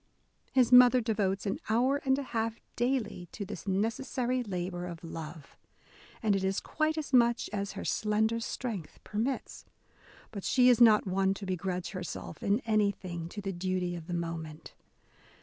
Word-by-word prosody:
His 255 -2 +3
mother 250 0 +8
devotes 205 -4 0
an 195 - -1
hour 250 +5 +3
and 265 0 +3
a 280 - -2
half 230 -2 -2 0.2
daily 240 -8 -1
to 205 - -5
this 185 - -8
necessary 240 +5 0
labour 180 -4 -4
of 170 -1 -8
love, 160 -2 -8 0.7
and 210 -2 +3
it 195 - -1
is 190 0 +1
quite 310 0 -1
as 295 -3 -4
much 235 -1 +3
as 200 -1 -2
her 200 - -6
slender 220 +2 +1
strength 225 -7 -5
permits. 230 +6 -3 0.7
But 200 -3 -6
she 250 -1 +5
is 245 -1 +4
not 220 -3 +7
one 190 0 +1
to 200 - -7
be 185 -1 -1
grudge 180 0 -3
herself 180 -4 -6
in 205 +5 +1
anything 200 -7 -1
to 205 - -6
the 195 -1 -3
duty 180 0 -2
of 170 -2 -8
the 175 - -2
moment. 165 -2 -5
205 Hz, 165 wpm, -30 LUFS, 180-235 Hz, 0.7 s, mother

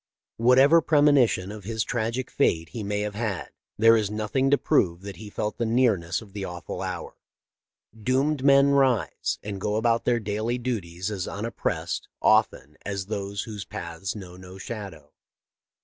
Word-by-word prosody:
" - - -67
Whatever 130 +7 +6
premonition 140 - +3
of 105 -1 -9
his 110 +2 -2
tragic 120 +2 -2
fate 80 -12 +1
he 115 - -6
may 105 0 -2
have 105 0 -3
had, 105 -4 -3 0.3
there 115 +1 +6
is 105 -3 +1
nothing 110 +6 0
to 145 - +5
prove 85 -8 +1
that 100 -1 -7
he 105 -1 -9
felt 105 +1 -4
the - - +1
nearness 110 -7 +1
of 100 -3 -17
the 100 -2 -5
awful 90 -2 -6
hour. - - -5 0.8
Doomed 130 +5 0
men 140 0 +6
rise 135 -5 +1
and 100 -2 -5
go 105 +1 -1
about 115 +1 +1
their 120 -1 +2
daily 110 +3 -2
duties 100 -6 -3
as 95 -3 -3
unoppressed, 110 +3 -3
often, 75 +3 +2
as 100 -2 -3
those 100 -1 -4
whose 105 -3 -6
paths 85 +3 -6
know 90 -4 -9
no 90 +1 -11
shadow. 100 0 -8
105 Hz, 165 wpm, -26 LUFS, 100-120 Hz, 0.8 s, Whatever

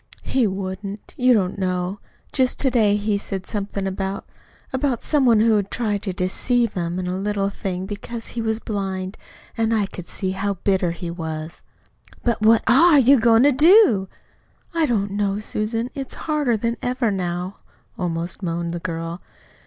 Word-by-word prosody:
"He 255 -4 +1
wouldn't. 195 +1 -5
You 255 0 +3
don't 190 -2 0
know. 185 +1 -1 0.3
Just 255 -2 +1
to 265 - +3
day 215 -4 +3
he 205 0 0
said 195 -2 -5
something 200 -1 -3
about 195 0 -3 0.5
about 260 -2 0
some 285 -4 +2
one 225 -3 +5
who 225 -1 +4
had 200 -1 -1
tried 210 -4 -1
to 205 -3 -3
deceive 220 +6 0
him 175 -1 -2
in 185 - -2
a 180 0 -2
little 200 0 -1
thing, 185 -2 -4
because 215 +3 -6
he 235 - -4
was 220 0 -1
blind; 190 -3 -4 0.4
and 225 0 +1
I 210 -2 +2
could 180 -2 -9
see 190 -1 -3
how 200 +1 -2
bitter 190 -1 +1
he 170 0 -5
was." 160 -1 -6 0.6
"But 235 -3 0
what 220 +1 +5
ARE 315 +5 +6
you 270 0 +6
goin' 230 +1 +5
to 290 - +6
do?" 300 - +6 0.7
"I 330 -2 +2
don't 205 -4 0
know, 200 0 0
Susan. 220 +3 -3
It's 270 -3 -5
harder 295 -7 +1
than 230 +2 -1
ever 245 -2 0
now," 180 0 -3 0.4
almost 170 +1 -3
moaned 170 -1 -2
the 175 - -3
girl. 165 0 -4
205 Hz, 175 wpm, -22 LUFS, 185-235 Hz, 0.7 s, ARE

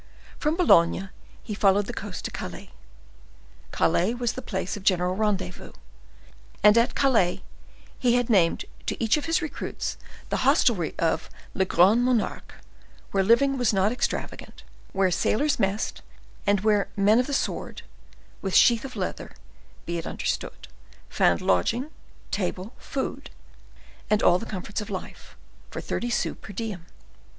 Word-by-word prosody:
From 305 +1 +1
Boulogne 190 - +4 0.3
he 215 - -5
followed 200 0 +3
the - - -6
coast 200 -2 -6
to - - -3
Calais. - - -7 1.0
Calais 180 +7 +1
was 240 -1 -1
the 260 - -6
place 190 -4 -3
of 205 - -8
general 185 -2 +2
rendezvous, 190 -4 -2 0.9
and 210 +1 +7
at 235 +1 +3
Calais 230 -11 +2 0.6
he 245 -1 +3
had 245 -1 +1
named 185 -8 +3 0.2
to - - -1
each 225 -1 +4
of 300 - -3
his 330 +1 +1
recruits 310 - -4 0.3
the - - 0
hostelry 245 - +2
of 165 - 0 0.2
"Le 190 - +1
Grande 200 +7 +4
Monarque," 245 -3 -1 0.6
where 195 -1 +2
living 265 +6 +3
was 240 -3 +2
not 195 +2 +2
extravagant, 245 - -4 0.3
where 190 -1 +2
sailors 270 - +1
messed, 195 +3 -1 0.5
and 200 -1 +3
where 210 -1 +2
men 205 +3 +4
of 250 - +1
the - - -4
sword, 275 - -3 0.6
with 195 -2 -2
sheath 235 -2 +5
of 265 -2 -8
leather, - - -5 0.5
be 170 0 -2
it 165 - -6
understood, - - -4 0.4
found 85 -1 +2
lodging, 235 - +1 0.4
table, 190 +2 -3
food, 270 - -4 0.8
and 215 0 +2
all 175 +1 +5
the 230 - -7
comforts 205 +2 -4
of 210 - -8
life, 190 -2 -8 0.3
for - - -6
thirty 240 - -3
sous 235 - -1
per 205 - -10
diem. 190 -5 -5
210 Hz, 150 wpm, -25 LUFS, 190-240 Hz, 1.0 s, and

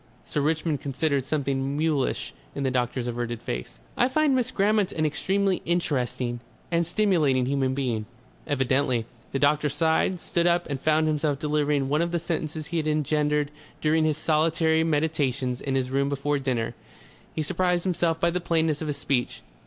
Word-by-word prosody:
Sir 150 - -1
Richmond 155 0 0
considered 140 -1 0
something 140 -1 -1
mulish 150 - 0 0.2
in 140 - -2
the 130 - +1
doctor's 125 0 -1
averted 120 -1 -3
face. - - -5 0.2
"I - - +3
find 300 +1 +2
Miss 255 -1 +1
Grammont 210 -3 +2
an 155 - 0
extremely 190 +6 0
interesting 125 -7 -1 0.3
and 170 -1 +2
stimulating 165 -10 +2
human 135 -1 0
being. 120 -6 -1 0.4
"Evidently." 130 -4 +1 0.3
The - - 0
doctor 150 +1 +3
sighed, 160 +5 +1
stood 170 0 0
up 175 0 +2
and 140 -3 -3
found 155 0 +3
himself 150 -2 +1
delivering 150 -1 +1
one 150 +3 +1
of 170 0 0
the 175 - +1
sentences 160 -2 -3
he 170 +1 -3
had 155 -1 0
engendered 150 -1 +1 0.3
during 155 +1 +2
his 155 -1 +1
solitary 160 0 +2
meditations 145 -5 0
in 135 -1 -2
his 130 -1 -1
room 140 +1 +1
before 140 +1 0
dinner. 120 -4 -1 0.6
He 155 - 0
surprised 180 +1 +1
himself 170 -3 0
by 170 - +2
the 180 +1 -2
plainness 160 -3 +1
of 160 - -3
his 145 -1 -2
speech. 135 -3 -1
150 Hz, 170 wpm, -26 LUFS, 135-165 Hz, 0.6 s, I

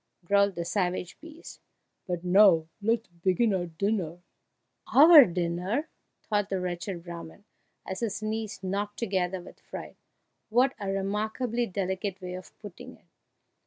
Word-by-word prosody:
growled 200 +1 +3
the 170 - -3
savage 180 -1 -2
beast, 325 +1 -12 0.5
"but 175 -1 -3
now 180 -3 +5 0.2
let 225 +2 +2
us 230 - -30
begin 195 +4 +2
our 180 -2 -1
dinner." 175 0 -2 0.8
"Our 300 0 +10
dinner!" 180 - -2 0.3
thought 205 -2 -1
the 190 - -1
wretched 180 0 -4
Brahman, 170 +2 -9 0.4
as 190 - -5
his 215 -2 -3
knees 215 -2 -4
knocked 205 +2 -3
together 190 -4 -1
with 175 - -13
fright; - - -9 0.5
"what 250 +4 +3
a 200 - -3
remarkably 215 +5 -1
delicate 190 0 -3
way 180 -1 -6
of 185 0 -10
putting 205 -4 -11
it!" - - -32
195 Hz, 140 wpm, -28 LUFS, 180-215 Hz, 0.8 s, Our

